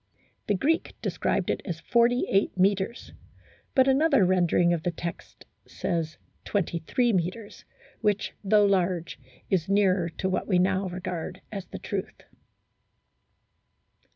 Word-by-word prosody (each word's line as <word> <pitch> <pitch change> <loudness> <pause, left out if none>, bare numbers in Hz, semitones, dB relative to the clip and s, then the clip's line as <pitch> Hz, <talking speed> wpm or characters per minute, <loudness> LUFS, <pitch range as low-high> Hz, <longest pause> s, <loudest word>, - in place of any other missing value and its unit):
The 205 - +2
Greek 320 - 0
described - - 0
it - - -3
as 170 -4 -5
48 235 -1 +2
metres; 195 +4 0 0.6
but 260 -1 +5
another 270 - +4
rendering 175 -1 +3
of 170 - -1
the 175 - -1
text 170 0 -7 0.2
says 165 -2 -3 0.3
23 200 +5 0
metres, 190 +4 -3 0.4
which, 205 -1 0
though 205 +1 +4
laro 185 -3 +2
e, 130 -5 -14
is 185 -2 +1
nearer 190 -3 +3
to 190 - -1
what 190 - -1
we 185 - +3
now 190 +1 +2
regard 180 0 -5
as 195 -3 -6
the - - -7
truth. - - -5
190 Hz, 125 wpm, -27 LUFS, 175-205 Hz, 0.6 s, but